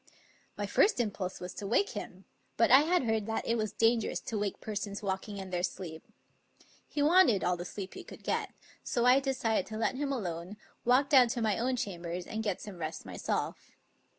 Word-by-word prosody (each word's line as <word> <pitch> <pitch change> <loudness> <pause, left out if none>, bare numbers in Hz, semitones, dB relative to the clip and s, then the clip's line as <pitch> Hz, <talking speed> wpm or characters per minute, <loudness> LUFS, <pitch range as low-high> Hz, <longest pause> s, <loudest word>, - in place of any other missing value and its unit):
My - - -1
first 415 - +3
impulse 200 -5 -2
was 180 0 -6
to 200 - -6
wake 400 - +2
him, - - -7 0.3
but - - +4
I 265 - +10
had 335 +2 +2
heard 220 -3 0
that 225 - -2
it 230 - +2
was 215 -3 -1
dangerous 225 +1 +2
to 225 - -5
wake 205 -2 -2
persons 205 -1 -4
walking 195 +1 -3
in 190 -1 -7
their 175 -1 0
sleep. 170 -3 -4 0.8
He 290 - -1
wanted 300 - +5
all 180 - +2
the 175 0 -6
sleep 195 0 -6
he - - -8
could - - -12
get, - - -1 0.3
so 240 -1 0
I 250 +2 +7
decided 255 -7 0
to 215 - -6
let 230 +3 0
him 285 0 -1
alone, 185 -5 -4 0.3
walk 255 +3 +4
down 260 -4 +7
to 235 +1 -2
my 215 -2 +1
own 255 +2 +1
chambers 175 -5 -4
and 220 - -4
get 205 -4 -1
some 195 -4 -8
rest 155 0 -5
myself. 90 -2 -3
215 Hz, 205 wpm, -31 LUFS, 185-250 Hz, 0.8 s, I